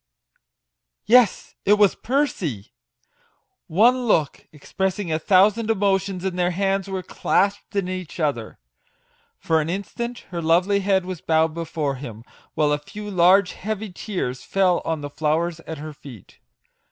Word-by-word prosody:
Yes, 240 Hz, -3 st, +4 dB
it 205 Hz, -, +4 dB
was 205 Hz, -2 st, +4 dB
Percy! 195 Hz, -, -2 dB, 0.9 s
One 240 Hz, +8 st, +3 dB
look, 155 Hz, -9 st, 0 dB
expressing 190 Hz, +4 st, -3 dB
a 155 Hz, -, 0 dB
thousand 205 Hz, +6 st, +3 dB
emotions, 195 Hz, -3 st, 0 dB
and 180 Hz, -1 st, -2 dB
their 175 Hz, 0 st, +2 dB
hands 195 Hz, +1 st, -1 dB
were 190 Hz, -1 st, -3 dB
clasped 200 Hz, +3 st, -1 dB
in 195 Hz, -2 st, 0 dB
each 185 Hz, -2 st, -6 dB
other! 140 Hz, -8 st, -2 dB, 0.8 s
For 160 Hz, -1 st, +1 dB
an 155 Hz, -, -4 dB
instant 235 Hz, +6 st, -4 dB
her 170 Hz, -1 st, -3 dB
lovely 180 Hz, +5 st, +3 dB
head 190 Hz, -2 st, +1 dB
was 185 Hz, -3 st, -6 dB
bowed 160 Hz, 0 st, +2 dB
before 155 Hz, -4 st, -3 dB
him, 115 Hz, -4 st, -9 dB, 0.3 s
while 150 Hz, -1 st, +2 dB
a 150 Hz, -, +1 dB
few 210 Hz, +7 st, -8 dB
large, 185 Hz, +1 st, +4 dB
heavy 215 Hz, 0 st, -5 dB
tears, 175 Hz, -, -4 dB
fell 185 Hz, -3 st, +2 dB
on 160 Hz, -2 st, -2 dB
the 145 Hz, -, -5 dB
flowers 155 Hz, +3 st, -1 dB
at 160 Hz, -, -5 dB
her 155 Hz, +1 st, -7 dB
feet 135 Hz, -8 st, -14 dB
180 Hz, 145 wpm, -23 LUFS, 155-200 Hz, 0.9 s, Yes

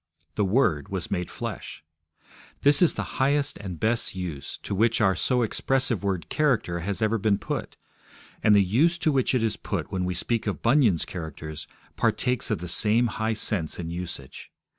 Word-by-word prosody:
The 105 Hz, -, 0 dB
Word 95 Hz, -, +1 dB
was 95 Hz, -3 st, -4 dB
made 90 Hz, -2 st, -2 dB
flesh. -, -, -6 dB, 0.8 s
This 145 Hz, 0 st, +6 dB
is 175 Hz, -, +4 dB
the -, -, -5 dB
highest 145 Hz, +1 st, +2 dB
and 95 Hz, -5 st, -7 dB
best 115 Hz, -3 st, 0 dB
use 85 Hz, -7 st, -5 dB
to -, -, -4 dB
which 115 Hz, +3 st, +2 dB
our 95 Hz, -4 st, +3 dB
so 125 Hz, +5 st, +1 dB
expressive 130 Hz, -1 st, 0 dB
word 95 Hz, -3 st, -2 dB
'character' 125 Hz, -, +1 dB
has 100 Hz, +5 st, -2 dB
ever 110 Hz, +1 st, +1 dB
been 100 Hz, -1 st, +2 dB
put, -, -, -5 dB, 0.6 s
and 105 Hz, -1 st, +5 dB
the 100 Hz, -, +6 dB
use 145 Hz, -, +2 dB
to 160 Hz, -2 st, +1 dB
which 130 Hz, -2 st, +1 dB
it 120 Hz, -, +1 dB
is 110 Hz, -3 st, 0 dB
put -, -, -4 dB
when 95 Hz, -1 st, -1 dB
we 90 Hz, 0 st, -2 dB
speak 115 Hz, +5 st, -1 dB
of 100 Hz, -, -3 dB
Bunyan's 115 Hz, -, +3 dB
Characters 80 Hz, -3 st, -7 dB, 0.3 s
partakes 120 Hz, +2 st, +1 dB
of -, -, +1 dB
the 90 Hz, -, -7 dB
same 110 Hz, +7 st, +3 dB, 0.2 s
high 110 Hz, +1 st, +1 dB
sense 100 Hz, -6 st, -1 dB
and 85 Hz, -1 st, -5 dB
usage. 85 Hz, -7 st, -7 dB
105 Hz, 185 wpm, -26 LUFS, 90-120 Hz, 0.8 s, This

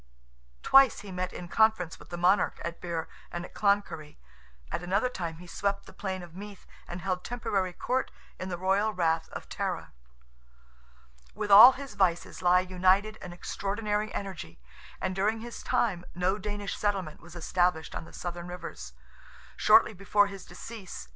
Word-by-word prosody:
Twice 270 Hz, -3 st, +6 dB
he 205 Hz, -2 st, -9 dB
met 185 Hz, 0 st, -3 dB
in 175 Hz, -, -7 dB
conference 220 Hz, -4 st, +2 dB
with -, -, -15 dB
the 175 Hz, -, -5 dB
monarch 180 Hz, +2 st, +3 dB
at 170 Hz, 0 st, -5 dB
Birr 170 Hz, -2 st, -3 dB, 0.2 s
and 175 Hz, 0 st, -4 dB
at -, -, -14 dB
Cloncurry—at 110 Hz, -, -3 dB
another 195 Hz, +7 st, +1 dB
time 170 Hz, -8 st, -5 dB
he 180 Hz, -, -11 dB
swept 200 Hz, +3 st, -2 dB
the -, -, -14 dB
plain 190 Hz, -2 st, -4 dB
of 170 Hz, -2 st, -12 dB
Meath, 200 Hz, 0 st, -9 dB, 0.2 s
and 175 Hz, +1 st, -6 dB
held 185 Hz, -1 st, -2 dB
temporary 200 Hz, -6 st, -1 dB
court 255 Hz, +8 st, -1 dB, 0.3 s
in 185 Hz, -, -4 dB
the 175 Hz, -, -3 dB
royal 195 Hz, +4 st, +2 dB
rath 165 Hz, -2 st, +1 dB
of -, -, -8 dB
Tara. -, -, -3 dB, 1.4 s
With 205 Hz, -, -3 dB
all 220 Hz, +6 st, +11 dB
his 275 Hz, 0 st, -8 dB
vices 175 Hz, -3 st, 0 dB
lie 180 Hz, 0 st, +5 dB
united 185 Hz, +4 st, +2 dB
an 180 Hz, -, -7 dB
extraordinary 210 Hz, +4 st, -2 dB
energy, 180 Hz, -, -6 dB, 0.4 s
and 185 Hz, 0 st, -2 dB
during 215 Hz, +3 st, +1 dB
his 235 Hz, 0 st, -8 dB
time, 185 Hz, -7 st, 0 dB
no 185 Hz, +3 st, +1 dB
Danish 205 Hz, 0 st, -4 dB
settlement 195 Hz, -7 st, -2 dB
was 175 Hz, +1 st, -13 dB
established 175 Hz, -1 st, 0 dB
on -, -, -5 dB
the -, -, -14 dB
Southern 175 Hz, 0 st, -6 dB
rivers. 65 Hz, -, -8 dB, 0.6 s
Shortly -, -, +5 dB
before 205 Hz, +1 st, +3 dB
his 195 Hz, -2 st, -8 dB
decease 190 Hz, -, -9 dB
(A.D. -, -, -26 dB
185 Hz, 165 wpm, -29 LUFS, 175-205 Hz, 1.4 s, all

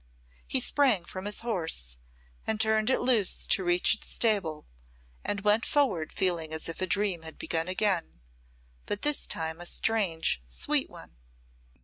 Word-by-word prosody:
He 265 Hz, -, +1 dB
sprang 250 Hz, -9 st, +3 dB
from 185 Hz, +2 st, -7 dB
his 205 Hz, 0 st, -3 dB
horse 160 Hz, -, -2 dB, 0.5 s
and 220 Hz, -, -1 dB
turned 220 Hz, 0 st, +2 dB
it 260 Hz, -, +2 dB
loose 240 Hz, -6 st, +3 dB
to 190 Hz, -, +2 dB
reach 175 Hz, +3 st, +3 dB
its 215 Hz, -, -7 dB
stable, 190 Hz, -9 st, 0 dB, 0.6 s
and 200 Hz, -, -2 dB
went 210 Hz, +2 st, +2 dB
forward 205 Hz, -, 0 dB
feeling 170 Hz, -4 st, -1 dB
as 160 Hz, 0 st, -2 dB
if 165 Hz, -, -5 dB
a 185 Hz, -, 0 dB
dream 195 Hz, -2 st, 0 dB
had 160 Hz, -1 st, -9 dB
begun 165 Hz, 0 st, -1 dB
again, 185 Hz, -, 0 dB, 0.7 s
but 205 Hz, -, -3 dB
this 295 Hz, -1 st, +2 dB
time 160 Hz, +1 st, -3 dB
a 175 Hz, -, -5 dB
strange, 180 Hz, -, 0 dB
sweet -, -, 0 dB
one. -, -, -14 dB
185 Hz, 155 wpm, -28 LUFS, 165-220 Hz, 0.7 s, sprang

